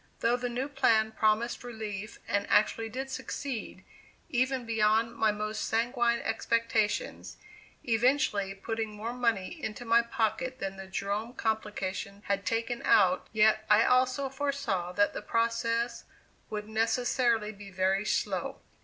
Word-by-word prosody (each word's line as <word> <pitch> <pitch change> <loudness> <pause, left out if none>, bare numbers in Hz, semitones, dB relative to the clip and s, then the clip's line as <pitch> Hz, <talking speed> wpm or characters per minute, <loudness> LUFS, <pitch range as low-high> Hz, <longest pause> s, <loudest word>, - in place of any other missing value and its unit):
Though 235 +1 +3
the 245 0 -2
new 250 +3 -2
plan 225 -6 +3
promised 220 +3 +1
relief, 215 -3 -6
and 205 0 0
actually 225 +1 +3
did 265 +4 -5
succeed, 265 -5 -5 0.5
even 255 -2 0
beyond 225 +1 +2
my 220 -1 +3
most 210 +1 -3
sanguine 235 +1 +1
expectations, 230 - -1 0.5
eventually 230 -4 +2
putting 220 +1 -4
more 225 +3 -4
money 235 - -1
into 220 +3 -4
my 230 +1 +5
pocket 240 +2 -1
than 195 -4 -4
the 195 0 -9
Jerome 200 +5 -3
complication 205 -2 -3
had 200 -1 -1
taken 230 +3 -1
out 185 -3 +4
yet 220 0 +4
I 210 +2 +6
also 255 +2 +3
foresaw 270 -10 -2
that 205 +2 +2
the - - -4
process 230 +1 0 0.4
would 210 -1 -4
necessarily 225 0 +1
be 200 -1 -11
very 190 +1 +1
slow. - - -1
225 Hz, 135 wpm, -30 LUFS, 210-240 Hz, 0.5 s, I